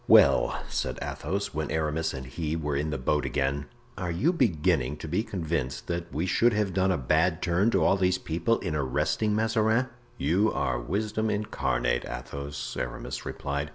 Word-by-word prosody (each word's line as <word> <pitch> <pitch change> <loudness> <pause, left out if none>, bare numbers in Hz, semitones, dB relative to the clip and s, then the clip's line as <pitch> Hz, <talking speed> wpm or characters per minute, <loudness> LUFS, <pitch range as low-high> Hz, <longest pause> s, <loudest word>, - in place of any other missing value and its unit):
"Well," - - +5
said 65 -1 -2
Athos, 100 +2 -3
when 75 -1 -2
Aramis 80 0 0
and 65 -1 -6
he 75 +5 -3
were 75 -3 -2
in 75 +2 0
the 75 - -2
boat 75 +3 +1
again, 70 +2 -1 0.3
"are 90 -3 -2
you 130 - +2
beginning 75 - +1
to 80 - -7
be 90 +7 +1
convinced 80 - -3
that 85 0 -3
we 75 +5 -1
should 115 +6 +3
have 105 -3 0
done 95 +1 +2
a 90 - +1
bad 80 +6 +2
turn 90 +5 +2
to 95 -7 +2
all 95 - +4
these 90 -1 +2
people 85 +9 0
in 85 -5 -2
arresting 75 - +1
Mazarin?" 110 +3 +2 0.3
"You 95 +8 +2
are - - 0
wisdom 105 - -1
incarnate, - - 0
Athos," 70 +4 -5
Aramis - - -4
replied. 70 +1 -3
80 Hz, 175 wpm, -28 LUFS, 70-100 Hz, 0.3 s, Well